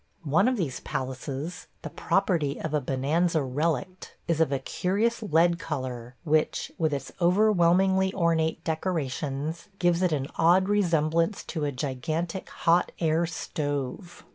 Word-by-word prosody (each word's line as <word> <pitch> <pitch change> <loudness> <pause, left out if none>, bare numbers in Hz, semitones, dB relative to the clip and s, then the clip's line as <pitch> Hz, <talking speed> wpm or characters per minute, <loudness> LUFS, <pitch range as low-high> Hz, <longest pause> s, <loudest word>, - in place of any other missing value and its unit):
One 165 - +3
of 255 -1 +1
these 155 -10 -2
palaces 135 +4 -5
– - - -41
the - - -6
property 170 -8 0
of 160 - -4
a 150 - +2
bonanza 150 +5 +1
relict 155 +6 -2
– - - -39
is 165 -2 +1
of 160 - +2
a 140 - +1
curious 205 - -1
lead 170 -3 +3
color, 130 -6 -5
which, 155 -1 +1
with 160 -2 +2
its 140 -1 -4
overwhelmingly 190 0 +4
ornate 165 -2 +1
decorations, 155 -2 -3
gives 175 -1 +2
it 180 -2 +2
an 140 -3 0
odd 180 +3 +4
resemblance 170 -2 +1
to 155 -4 -3
a 145 - -1
gigantic 155 +7 -3
hot 170 +2 +2
air 165 0 +1
stove. 145 +1 -4
165 Hz, 145 wpm, -27 LUFS, 145-180 Hz, -, overwhelmingly